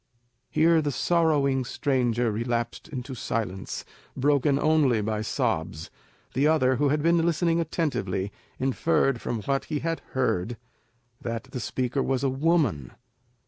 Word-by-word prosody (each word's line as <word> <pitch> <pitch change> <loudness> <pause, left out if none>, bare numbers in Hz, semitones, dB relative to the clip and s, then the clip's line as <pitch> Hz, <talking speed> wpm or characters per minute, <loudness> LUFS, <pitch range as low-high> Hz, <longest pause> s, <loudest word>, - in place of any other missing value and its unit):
Here 165 0 +4
the 145 -1 -1
sorrowing 145 -3 +2
stranger 125 -3 0
relapsed 115 +4 -2
into 135 -3 -6
silence, 110 -5 -3 0.3
broken 140 +1 +3
only 145 -6 +3
by 105 0 -1
sobs. 80 -7 -2 0.4
The 140 +4 +3
other, 130 -5 +3
who 145 +2 +2
had 150 +1 +1
been 170 0 +4
listening 170 0 +2
attentively, 100 - -1 0.3
inferred 135 -1 +1
from 115 -3 -3
what 135 +5 0
he 155 - -2
had 165 0 -1
heard 120 -4 0 0.6
that 115 -1 -3
the 125 - -4
speaker 130 +4 -1
was 135 0 0
a 135 - +3
woman. 135 - +1
135 Hz, 135 wpm, -26 LUFS, 120-155 Hz, 0.6 s, Here